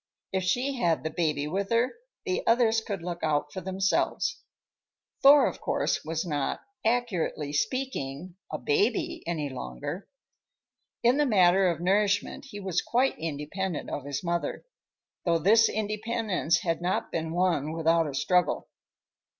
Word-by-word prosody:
If 190 -1 0
she 255 +8 0
had 170 -7 +1
the 160 - -2
baby 155 -3 0
with 195 +6 -2
her, 235 +2 +2 0.3
the 385 +4 0
others 230 -1 +4
could 200 -5 -5
look 175 0 -5
out 150 -1 0
for 190 - -5
themselves. 190 +1 0 0.8
Thor, 285 +1 +8
of - - -3
course, - - 0
was 160 +1 -2
not, 145 -5 -1 0.2
accurately 210 -11 0
speaking, 175 - -2 0.2
a - - -2
baby 375 -6 0
any 160 -4 -1
longer. 130 - -6 0.9
In 240 +3 +4
the 295 -1 +3
matter 190 -3 +5
of 170 - -2
nourishment 200 +2 +1
he 220 -7 -8
was 190 -3 -1
quite 255 +3 +1
independent 165 +3 -4
of 140 - -4
his 140 +2 -4
mother, 170 0 -2 0.6
though 170 -2 +2
this 220 +7 +5
independence 215 -4 0
had 165 -1 -1
not 180 +1 -1
been 160 -1 -2
won 170 -4 +1
without 165 0 +2
a 140 - -5
struggle. 180 +5 +1
180 Hz, 145 wpm, -28 LUFS, 160-225 Hz, 0.9 s, Thor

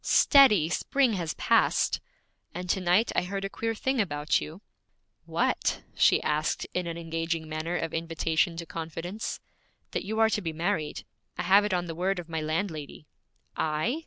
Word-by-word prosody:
'Steady! 230 - +6
Spring 255 +8 +1
has 170 -5 -2
passed.' - - +2 0.5
'And 180 +1 -5
to 190 - -1
night 185 +6 +3
I - - +3
heard 195 +2 -4
a - - -3
queer 225 0 -2
thing 265 +2 0
about 150 -5 0
you.' 165 +7 -8 0.6
'What?' - - 0
she - - +4
asked 155 +1 0
in 180 -1 -1
an 165 0 -4
engaging 165 -1 -3
manner 155 +3 -3
of 165 -2 -3
invitation 165 +1 0
to 170 - -5
confidence. 165 +6 -5 0.5
'That - - -2
you 220 +3 -3
are 225 0 +5
to 210 - 0
be 165 -4 -3
married. 165 -2 -2 0.3
I - - -2
have 195 +3 +5
it 210 - -1
on 175 0 -1
the 165 - -5
word 185 +3 -1
of 175 -2 -6
my 160 -1 -2
landlady.' 155 -2 -3 0.5
'I?' 160 - 0
170 Hz, 175 wpm, -28 LUFS, 160-200 Hz, 0.6 s, Steady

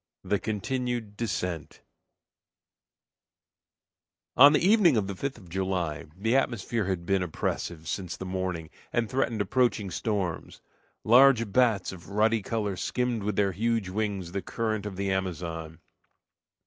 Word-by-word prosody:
THE 105 - 0
CONTINUED 115 0 -3
DESCENT 90 -7 -4 2.5
On 140 +2 +9
the 150 - +4
evening 185 - +5
of 105 - +1
the 100 - -4
5th 135 +8 -4
of 95 -5 -15
July, 90 -3 -2
the 110 +5 +1
atmosphere 120 -4 0
had 90 -3 -2
been 95 +1 +2
oppressive 80 -1 -3
since 90 -1 -4
the 95 - -6
morning 90 -3 -3 0.2
and 120 -1 0
threatened 120 -3 0
approaching 110 -2 +1
storms. 100 -6 -3 0.4
Large 120 -2 +6
bats 115 -4 +2
of 90 -1 -11
ruddy 110 +2 +2
color 105 -1 -2
skimmed 125 +3 -1
with 105 0 -2
their 100 -1 +2
huge 115 0 0
wings 100 -3 -2
the 100 +1 -2
current 110 -2 -2
of 100 - -6
the 100 0 -1
Amazon. 85 -4 -3
100 Hz, 135 wpm, -28 LUFS, 95-115 Hz, 2.5 s, On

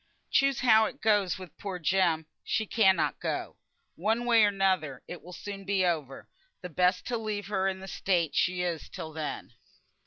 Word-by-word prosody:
Choose 275 -2 +3
how 220 -3 +6
it - - -6
goes 205 -4 +2
wi' 185 - -7
poor 195 -3 -4
Jem, 170 -2 +1 0.2
she 220 - 0
cannot 195 -3 +2
go. - - -3 0.4
One 225 +3 0
way 230 -2 +5
or - - +6
another 185 -9 0
it 175 - -8
will 180 - -12
soon 195 +2 -7
be 195 -1 +1
over, 150 -6 -2 0.4
and 180 -4 -8
best 180 0 +2
to 240 -2 -2
leave 210 -2 -3
her 195 -2 +1
in 190 0 -3
the 190 - -8
state 175 -5 0
she 180 0 +1
is 170 -3 -3
till 160 -1 -7
then." 155 -1 -5
190 Hz, 185 wpm, -29 LUFS, 175-210 Hz, 0.4 s, how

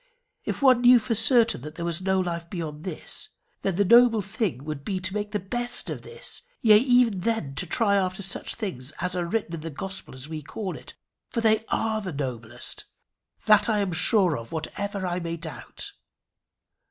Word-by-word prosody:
If - - -3
one 255 -3 +6
knew 245 0 +8
for 230 0 -1
certain 235 - +4
that 150 +3 -8
there 170 - -4
was 170 +1 -1
no 190 0 +2
life 170 -2 -3
beyond 160 -4 -5
this, 180 -4 -4 0.3
then 195 -3 0
the 200 +2 +3
noble 235 0 +6
thing 195 - -2
would 150 -2 -5
be 190 +4 -2
to 185 +1 -2
make 210 0 -2
the 210 - -1
best 240 +6 -2
of - - -5
this, 470 +1 -6 0.2
yea 215 -2 +7
even 245 -5 +4
then 190 -8 -1
to 135 - -3
try 205 -4 +2
after 190 0 -1
such 190 - -3
things 165 - -4
as 180 +1 -1
are 175 -1 -1
written 205 -3 -2
in 165 - -3
the 165 - -5
Gospel 190 +1 -6
as 130 +2 -8
we 155 -1 -5
call 185 +6 -5
it - - -12 0.3
for 230 - -1
they 220 0 +3
are 220 -1 0
the 190 -3 -4
noblest. 120 -4 -4 0.6
That 215 +2 +5
I 215 - +2
am 200 -3 0
sure 180 0 +3
of, 115 0 -11
whatever 200 +5 -3
I 175 0 -1
may 170 -1 -4
doubt. 160 -2 -7
190 Hz, 200 wpm, -26 LUFS, 165-220 Hz, 0.6 s, knew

